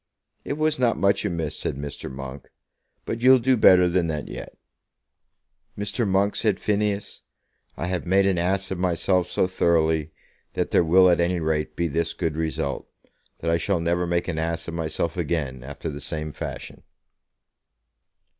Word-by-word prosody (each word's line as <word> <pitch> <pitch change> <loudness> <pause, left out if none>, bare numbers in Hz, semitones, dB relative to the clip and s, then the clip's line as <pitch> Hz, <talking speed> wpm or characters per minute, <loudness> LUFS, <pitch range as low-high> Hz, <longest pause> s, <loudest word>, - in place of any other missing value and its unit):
"It - - -3
was 155 0 0
not 120 -2 +2
much 100 +2 +2
amiss," 80 -6 -2
said - - -2
Mr. 70 -1 -6
Monk; 65 +1 -8 0.6
"but 115 - -4
you'll 130 +1 +7
do 130 +1 +2
better 90 -5 +6
than 90 -1 +1
that 75 -2 -3
yet." - - -8 1.2
"Mr. 105 +3 -1
Monk," 100 +1 +2
said 105 -4 +1
Phineas, 105 -1 -1 0.6
"I - - -3
have 90 -1 -3
made 95 +2 +4
an 95 -3 +2
ass 95 +3 0
of 95 - -3
myself 90 0 +1
so - - +1
thoroughly, 80 -4 +1 0.4
that - - -2
there - - +4
will 90 +3 +6
at 85 -1 +4
any 85 +1 +1
rate 75 -1 -1
be 85 - 0
this 85 +2 -1
good 80 -2 -2
result, 80 -3 -3 0.5
that 85 - 0
I 85 - +2
shall 100 0 0
never 85 +1 0
make 85 0 0
an 80 -3 -2
ass 80 +1 -2
of 85 - -5
myself 80 0 -2
again 75 -7 -2
after 70 +4 -7
the 75 -2 -5
same 75 +1 -4
fashion." - - -7
85 Hz, 170 wpm, -24 LUFS, 80-95 Hz, 1.2 s, you'll